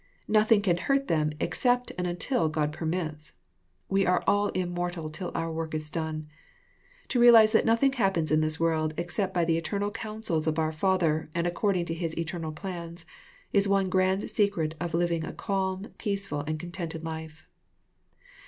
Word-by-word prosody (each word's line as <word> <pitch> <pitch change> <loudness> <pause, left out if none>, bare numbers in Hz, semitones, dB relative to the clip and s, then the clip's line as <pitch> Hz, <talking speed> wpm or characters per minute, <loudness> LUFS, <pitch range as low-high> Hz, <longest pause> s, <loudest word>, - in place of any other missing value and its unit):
Nothing 215 -1 +4
can 175 -4 +2
hurt 275 +7 +1
them 155 -5 +1
except 245 +9 +1
and 180 0 -2
until 175 - +1
God 150 -1 -1
permits. 155 -1 -3 0.5
We 195 0 +2
are 180 -1 +2
all 205 0 +3
immortal 175 -3 -3
till 180 +2 -5
our 165 0 -1
work 160 0 -4
t3 155 -1 -4
done. 160 -2 -3 0.8
To 250 - +1
realize 230 -3 +8
that 220 - +3
noth 230 +3 +3
ing 270 -1 +4
happens 195 - +1
in 155 0 +4
this 155 0 0
world^xcept 165 +4 0
by 175 -2 +1
the 165 0 +1
etern 200 +4 -2
al 205 - -1
cou 215 0 -6
nsels 165 -8 -1
of 155 0 0
our 160 -1 +1
Father, 160 -2 +1
and 170 0 0
according 180 0 0
to 165 - -3
His 165 -1 -4
eternal 165 -1 -3
plans, 170 0 -7 0.5
is 200 0 +3
one 195 -1 +2
grand 190 +1 +1
secret 190 -7 +1
of 170 -2 -2
living 170 -1 +1
a - - -5
calm, 195 0 -2
peaceful, 200 -7 -2
and 155 0 -2
contented 170 -1 -6
life. 160 -1 -7
175 Hz, 175 wpm, -28 LUFS, 160-200 Hz, 0.8 s, realize